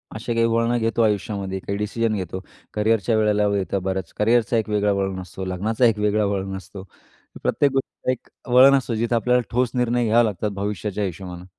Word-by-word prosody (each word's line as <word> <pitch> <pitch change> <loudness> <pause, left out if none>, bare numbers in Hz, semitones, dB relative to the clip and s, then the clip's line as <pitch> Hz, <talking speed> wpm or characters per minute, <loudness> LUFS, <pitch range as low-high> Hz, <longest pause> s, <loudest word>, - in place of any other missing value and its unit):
अशा 110 +2 -3
काही 115 0 +2
वळणं 115 +1 +1
घेतो 115 0 0
आयुष्यामध्ये, 100 -3 -1
काही 100 +1 -4
डिसिजन 110 +2 -1
घेतो. 95 -1 -4 0.3
करिअरच्या 110 0 +1
वेळेला 105 -1 +2
येतं, 95 0 -2
बरंच 95 -2 -3
करिअरचा 115 +1 +2
एक 110 -1 -1
वेगळा 105 -1 +1
वळण 95 -1 -2
असतो, 95 +1 -7
लग्नाचा 105 +6 0
एक 110 -3 +3
वेगळा 105 0 +2
वळण 95 -1 -2
असतो. 95 +1 -10 0.6
प्रत्येक 145 - +2
गोष्टीचं 135 -1 -2
एक 130 - -6 0.3
वळण 135 +2 +8
असतं, 125 -3 -3
जिथे 115 +2 0
आपल्याला 125 +2 +2
ठोस 125 +1 +1
निर्णय 120 -1 +1
घ्यावे 115 +2 +4
लागतात 105 0 -2
भविष्याच्या 105 +1 -3
हिशोबानं. 90 -1 -7
105 Hz, 180 wpm, -22 LUFS, 100-115 Hz, 0.6 s, वळण